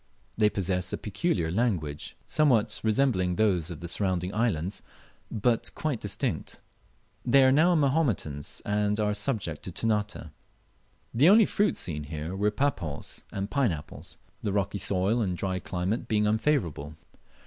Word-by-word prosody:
They 105 -1 +4
possess 95 -2 -1
a - - -1
peculiar 100 - -1
language, 90 -9 -1
somewhat 115 -8 +2
resembling 110 -6 +2
those 95 -6 +2
of 85 -2 -7
the 85 - -5
surrounding 90 0 0
islands, 100 -5 -1 0.5
but 115 +1 +1
quite 150 -7 -2
distinct. 100 -2 -2 0.6
They 135 +2 +5
are 130 - +6
now 165 +6 +4
Mahometans, 135 - 0
and 105 0 0
are 105 -1 +1
subject 105 0 -1
to 95 - -5
Ternate, 105 -5 -2 0.8
The 140 +9 +5
only 215 +2 +7
fruits 205 +2 +1
seen 75 -4 -3
here 80 +4 -5
were 105 +2 +2
papaws 100 - -2
and 100 +1 -4
pine 140 -7 +2
apples, 75 -3 -7 0.2
the 105 - -1
rocky 100 0 -1
soil 100 +6 +1
and 90 -5 -1
dry 95 0 -2
climate 90 +6 -2
being 105 -2 +2
unfavourable. 105 - 0
105 Hz, 145 wpm, -28 LUFS, 90-120 Hz, 0.8 s, only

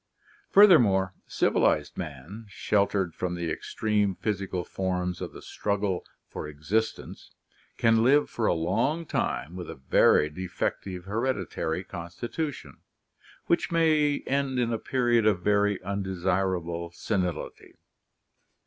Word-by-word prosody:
Fur 205 +1 +9
thermore, 100 - +4
civilized - - +1
man, 80 - -7
sheltered 100 -3 0
from 90 +1 -3
the 85 -2 -3
extreme 105 +2 0
physical 95 -4 -2
forms 90 -1 -2
of - - -4
the - - -12
struggle 100 -3 -2 0.2
for - - -6
existence, 80 +10 -3 0.5
can 115 0 +4
live 145 +4 +4
for 115 - -1
a - - +3
long 130 - 0
time 85 - -2
with 90 -1 -7
a - - -6
very 65 +2 +4
defective 90 +2 -4
hereditary 100 -6 -2
constitution, 100 - -6 0.7
which 170 - +1
may 155 -3 +2
end 135 -1 0
in 120 -1 +1
a 115 - -1
period 120 -4 +2
of 95 -4 +2
very 105 -1 +2
undesirable 95 -3 -1
senility. 90 -1 -3
100 Hz, 120 wpm, -27 LUFS, 90-115 Hz, 0.7 s, Fur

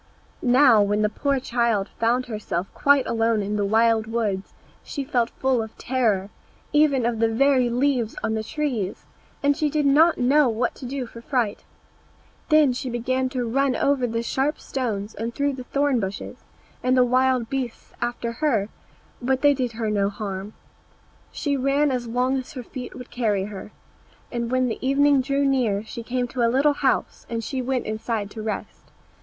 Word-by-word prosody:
Now, 250 -3 +6
when 205 +1 +1
the 210 - +2
poor 275 +5 0
child 235 -5 0
found 240 +3 +2
herself 210 -6 -3
quite 280 -2 +3
alone 225 -2 +1
in 205 +1 -2
the 205 - 0
wild 220 +1 +3
woods, 215 -4 -2 0.3
she 280 - -4
felt 245 -4 0
full 260 -3 0
of 220 0 -8
terror, 215 -6 0 0.4
even 290 -5 +3
of 235 -2 0
the 225 - +4
very 255 +2 +3
leaves 245 -2 0
on 220 - 0
the 220 0 -2
trees, 235 -7 -3 0.4
and 285 0 +3
she 305 0 0
did 295 0 0
not 310 +4 +5
know 270 +2 +4
what 235 +2 -1
to 255 - -7
do 265 0 -3
for 230 0 -11
fright. 235 -5 -1 0.8
Then 305 -4 +5
she 255 +1 -4
began 255 +2 -1
to 250 -2 -2
run 270 +2 +1
over 275 -3 +1
the 230 0 -2
sharp 270 +5 -1
stones 220 -6 -3
and 230 +2 -5
through 285 0 0
the 255 -1 -7
thorn 280 -2 +1
bushes, 195 -1 -6 0.4
and 255 +1 +2
the 250 - +6
wild 255 -1 +2
beasts 255 -2 -5
after 240 -1 -2
her, 230 -6 0 0.5
but 260 +2 0
they 290 0 +6
did 255 -3 -2
her 220 -1 -2
no 200 -1 +1
harm. 200 0 -5 0.8
She 285 -2 -1
ran 275 +2 +2
as 245 -2 -2
long 250 +3 +1
as 260 -1 -6
her 255 -3 -6
feet 250 +1 -8
would 250 -1 -10
carry 210 -5 0
her; 210 0 -8 0.6
and 235 -1 -2
when 255 0 +2
the 230 - -4
evening 275 +1 +4
drew 275 +1 0
near 240 -7 +1
she 235 +2 -7
came 245 +1 -2
to 255 - -3
a 230 - +4
little 275 +4 +3
house, 265 -2 0
and 230 -1 -3
she 260 +3 -3
went 255 0 -1
inside 215 -1 -3
to 220 - -7
rest. 215 0 -6
245 Hz, 185 wpm, -24 LUFS, 225-270 Hz, 0.8 s, Now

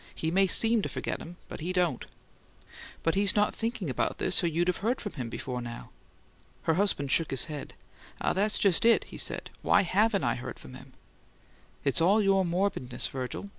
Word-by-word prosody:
"He 160 - -2
may 195 +2 +4
seem 225 +3 +3
to - - -3
forget - - -4
'em, 175 +2 -10
but - - -8
he 170 +4 -3
don't." 180 -8 0 1.0
"But 165 - +2
he's 200 0 +3
not 210 0 +2
thinking 225 -5 -3
about 130 - -1
this, 185 0 +2
or - - +3
you'd 170 +2 0
have 180 - +1
heard 235 +6 -1
from 205 - -6
him 125 -5 -5
before 125 +2 -5
now." 120 0 -8 0.7
Her 160 - +2
husband 160 -7 0
shook 165 - +3
his 135 - +2
head. 150 -3 -7 0.4
"Ah, - - 0
that's 205 +3 +2
just 195 -5 +3
it!" 230 0 +5
he - - -10
said. - - -1
"Why - - +4
HAVEN'T 200 +3 +2
I - - +2
heard 120 - -7
from 65 - -13
him?" - - -13 0.9
"It's 140 +3 +1
all 195 +6 +4
your 195 -2 +3
morbidness, 175 -8 -1
Virgil. 130 +9 -5
180 Hz, 200 wpm, -29 LUFS, 145-200 Hz, 1.0 s, it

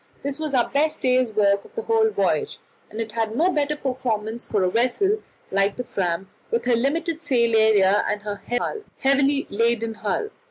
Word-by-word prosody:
This 280 +1 -3
was 305 -3 -2
our 245 - +3
best 305 +2 0
day's 255 -2 +2
work 200 -2 +2
of 460 - -18
the 455 - -3
whole 445 -1 +3
voyage, - - 0 0.3
and 215 - -8
it 225 -1 -4
is 225 -1 -1
no 340 +7 +3
bad 295 -3 0
performance 235 -4 -2
for 205 -3 0
a 185 - +2
vessel 385 - +1 0.3
like 195 +1 +1
the 250 - -4
Fram, 190 -4 -2 0.2
with 235 +1 -1
her 245 -1 +3
limited 315 +6 -1
sail 235 -6 +2
area 205 -2 +4
and 210 - -2
her 205 -1 -5 0.6
heavily 275 +1 +2
laden 230 +1 +1
hull. 220 - -2
235 Hz, 185 wpm, -23 LUFS, 215-285 Hz, 0.6 s, area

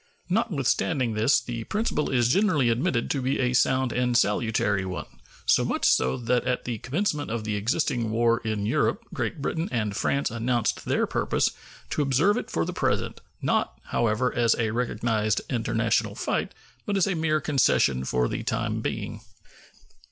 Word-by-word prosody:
Notwithstanding 140 - 0
this, 110 +5 +3
the 120 -2 -6
principle 210 -8 -1
is 120 -3 +2
generally 155 - +3
admitted 115 0 0
to 140 - 0
be 130 +3 0
a 125 -1 +1
sound 130 0 +2
and 125 -1 +1
salutary 105 -2 +1
one, 95 -1 -4 0.4
so - - +4
much - - -1
so 65 +1 +3
that 120 0 0
at 125 0 -1
the 120 -3 -3
commencement 150 - -1
of 115 -1 -3
the 105 -1 -2
existing 115 +1 0
war 115 +1 +2
in 110 -2 -2
Europe 155 - 0
Great 150 -5 -3
Britain 165 +3 -2
and 105 -4 -1
France 140 +3 0
announced 120 0 -1
their - - +1
purpose - - 0 0.4
to - - 0
observe 145 +9 +3
it - - -4
for 85 - -1
the - - -4
present; - - -1 0.2
not, - - 0
however, 120 +2 +1
as 120 -1 +3
a 110 -2 0
recognized 110 -2 0
international 120 -3 0
fight, - - -2 0.3
but 205 -1 0
as 190 - +3
a 195 - 0
mere 160 -2 +1
concession 130 - +2
for 60 -1 0
the - - -3
time - - -2
being. - - -4
120 Hz, 165 wpm, -26 LUFS, 110-140 Hz, 0.4 s, so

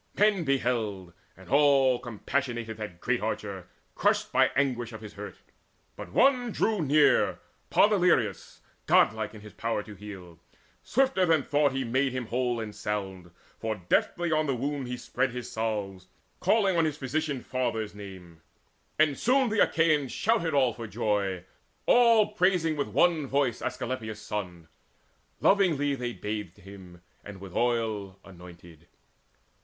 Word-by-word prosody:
Men 205 -3 +3
beheld, 115 - -1 0.2
and 95 - -15
all 140 -3 +4
Compassionated 120 -1 -3
that 105 -5 -7
great - - 0
archer, - - -4 0.3
crushed - - +1
By - - +4
anguish 120 -4 0
of 110 - -8
his 105 -2 -10
hurt. 105 0 -8 0.6
But - - -9
one 250 -3 +3
drew 215 -2 0
near, 150 0 +3 0.3
Podaleirius, 180 - +2 0.3
godlike 110 0 +3
in 105 - -11
his 105 0 -12
power 115 -2 -2
to 105 - -11
heal. 95 -5 -11 0.4
Swifter 260 -8 +1
than 160 -3 +3
thought 145 -1 +2
he 135 0 -1
made 130 +2 0
him 130 -1 -3
whole 120 +1 -1
and 110 -2 -5
sound; 95 -4 -4 0.3
For 110 -1 -2
deftly 165 - 0
on 155 0 +1
the 135 - 0
wound 140 +1 -3
he 125 0 -4
spread 125 +1 -1
his 125 -1 -6
salves, 100 -4 -3 0.3
Calling 200 -5 +2
on 165 - +3
his 150 -2 -2
physician 145 -1 -2
father's 115 -5 -2
name; 95 -5 -11 0.6
And 155 -3 +2
soon 260 +1 +3
the 220 0 -1
Achaeans 155 -5 +2
shouted 200 -8 0
all 130 -4 +3
for 115 0 -7
joy, 100 -4 -1 0.4
All 230 -3 +5
praising 180 -5 +2
with 145 - -2
one 165 -5 +2
voice 135 -3 0
Asclepius' 120 -3 -4
son. 90 -6 -6 0.7
Lovingly 160 -8 +3
then 135 - -5
they 120 -1 -2
bathed 105 -5 -5
him, 90 -2 -13 0.2
and 105 -2 -10
with 95 -2 -10
oil 110 -5 -1
Anointed. 85 -3 -14
120 Hz, 150 wpm, -28 LUFS, 105-150 Hz, 0.7 s, All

